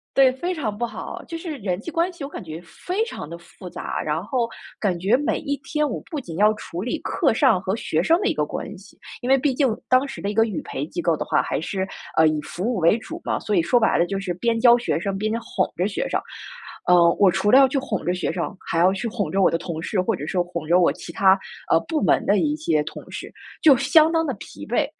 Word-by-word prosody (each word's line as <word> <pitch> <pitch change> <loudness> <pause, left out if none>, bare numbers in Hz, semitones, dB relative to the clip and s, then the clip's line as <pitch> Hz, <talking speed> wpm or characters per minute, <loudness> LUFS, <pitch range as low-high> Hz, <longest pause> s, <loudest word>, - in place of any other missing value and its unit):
对， 270 -1 +6
非 350 +8 -3
常 240 - -3
不 240 - -1
好。 235 - -7
就 335 - -6
是 325 -4 -5
人 190 -6 -2
际 220 - -7
关 335 +3 0
系 345 - -9
我 275 - -5
感 - - -8
觉 160 -1 -8
非 365 - -3
常 300 - -7
地 165 - -7
复 180 +2 -13
杂， - - -5
然 155 +3 -2
后 235 +2 -1 0.3
感 190 -5 0
觉 200 +8 +3
每 290 - -1
一 285 -2 -2
天 300 +1 -1
我 - - -3
不 305 - -2
仅 170 -11 -8
要 210 +2 +5
处 180 -4 -6
理 245 - -2
课 - - +1
上 260 -10 +4
和 190 +2 -2
学 165 -7 -1
生 325 - +4
的 415 - +1
一 - - +1
个 - - 0
关 - - -6
系- - - -17 0.3
因 245 - -3
为 270 - +6
毕 270 -1 +1
竟 275 +1 +3 0.2
当 255 +2 +4
时 270 - -8
的 200 - -2
一 - - -3
个 225 +1 +4
语 210 -7 -4
培 135 - -4
机 175 +3 -5
构 165 -2 +1
的 - - -3
话， - - +2
还 - - -2
是， 190 +4 -3 0.3
呃， 160 - +5
以 155 -1 +1
服 175 +4 -7
务 240 +3 0
为 170 +3 +4
主 325 +9 -8
嘛， - - -1
所 210 - -1
以 175 - +4
说 240 +9 +3
白 220 - +2
了 170 - +3
就 195 +2 -3
是 185 -2 -3
边 230 +5 0
教 240 0 +7
学 240 - -1
生 195 +2 -3
边 215 +2 -1
哄 - - -1
着 180 +3 0
学 210 - -3
生。 - - -1 0.6
呃， 175 -1 +6
我 195 -2 +4
除 205 - 0
了 255 - +7
要 270 -1 +7
去 270 +1 -1
哄 - - -4
着 180 - +1
学 180 - -2
生， 170 +2 -4
还 - - -1
要 180 +3 +5
去 195 +5 -3
哄 210 -3 -3
着 195 - +1
我 - - +5
的 165 - 0
同 165 -2 -5
事， 185 +3 -2
或 205 +4 0
者 150 -3 -6
说 180 +1 0
哄 170 -3 -6
着 175 +3 +4
我 175 - +4
其 - - -9
他， 190 +1 +4 0.3
呃， - - +6
部 315 -3 -1
门 - - +3
的 200 0 +3
一 300 -1 +1
些 160 - +1
同 - - -9
事， - - -7 0.3
就 295 -4 +8
相 305 +4 +5
当 325 -1 +1
地 - - -1
疲 - - -10
惫。 - - +1
210 Hz, 295 characters per minute, -23 LUFS, 175-270 Hz, 0.6 s, 就